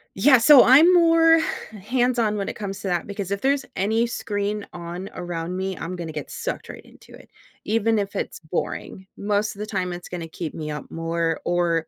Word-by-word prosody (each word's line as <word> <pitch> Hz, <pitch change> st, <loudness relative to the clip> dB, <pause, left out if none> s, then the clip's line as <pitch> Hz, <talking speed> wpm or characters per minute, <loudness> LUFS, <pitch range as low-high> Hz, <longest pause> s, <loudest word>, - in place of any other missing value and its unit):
Yeah, 255 Hz, +7 st, +6 dB
so 275 Hz, +2 st, +8 dB
I'm 290 Hz, +8 st, +7 dB
more 330 Hz, -1 st, +5 dB, 0.4 s
hands-on 240 Hz, -2 st, +1 dB
when 200 Hz, -, -2 dB
it -, -, -6 dB
comes 195 Hz, -2 st, -5 dB
to 195 Hz, -, -5 dB
that 175 Hz, -2 st, -1 dB
because 200 Hz, -2 st, -5 dB
if 200 Hz, -, -2 dB
there's 275 Hz, +1 st, +1 dB
any 220 Hz, +4 st, +1 dB
screen 205 Hz, -2 st, -3 dB
on 175 Hz, +2 st, -7 dB
around 175 Hz, 0 st, -5 dB
me, 190 Hz, -1 st, -3 dB
I'm 180 Hz, +2 st, -5 dB
gonna 170 Hz, -2 st, -6 dB
get 150 Hz, -2 st, -7 dB
sucked -, -, -5 dB
right -, -, -9 dB
into -, -, -18 dB
it, -, -, -15 dB, 0.4 s
even 225 Hz, 0 st, +1 dB
if 200 Hz, -1 st, -4 dB
it's -, -, -4 dB
boring. 180 Hz, +3 st, -5 dB
Most 205 Hz, +1 st, -1 dB
of 200 Hz, -, -14 dB
the 210 Hz, -, -3 dB
time 185 Hz, -4 st, -2 dB
it's 175 Hz, 0 st, -9 dB
gonna 170 Hz, -2 st, -5 dB
keep 160 Hz, -1 st, -6 dB
me 155 Hz, -1 st, -5 dB
up 150 Hz, -, -7 dB
more 165 Hz, 0 st, -2 dB
or 170 Hz, -2 st, +1 dB
195 Hz, 200 wpm, -23 LUFS, 175-225 Hz, 0.4 s, so